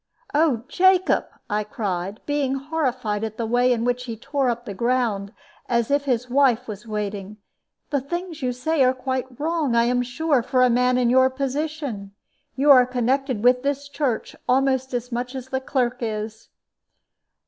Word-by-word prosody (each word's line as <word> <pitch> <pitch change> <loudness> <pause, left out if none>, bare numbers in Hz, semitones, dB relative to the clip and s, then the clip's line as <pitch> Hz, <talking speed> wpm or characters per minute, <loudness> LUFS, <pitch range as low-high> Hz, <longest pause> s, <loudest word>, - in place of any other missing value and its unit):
"Oh, 290 -6 +2
Jacob!" 375 +3 +3 0.2
I 210 -1 -1
cried, 200 -2 -4
being 285 -2 0
horrified 255 -7 -2
at 220 -1 -4
the 230 - -2
way 245 +2 +2
in 235 -1 0
which 245 0 -1
he 230 -2 -5
tore 275 +2 -1
up 240 0 -3
the 205 - -5
ground, 230 -3 0 0.4
as 235 0 +1
if 285 0 +2
his 250 -2 0
wife 255 -2 +2
was 215 +1 -8
waiting, 210 -1 -4 0.5
"the 285 -2 +1
things 345 +3 -5
you 250 -1 0
say 270 +4 +1
are 255 0 +3
quite 260 -1 -4
wrong, 310 -5 0
I 235 - +5
am 245 +1 +2
sure, 260 +3 +1
for 255 +2 +2
a 250 - +4
man 250 +1 +3
in 245 -1 +2
your 260 +1 +5
position. 275 -6 -4 0.4
You 285 +2 +5
are 250 -2 +7
connected 255 -1 0
with 250 0 +5
this 280 +1 -2
church 280 -5 -2
almost 265 0 +2
as 245 +1 -4
much 245 +2 -3
as 260 0 -6
the 265 0 -2
clerk 255 -2 0
is." 220 -1 -5
250 Hz, 175 wpm, -23 LUFS, 235-275 Hz, 0.5 s, are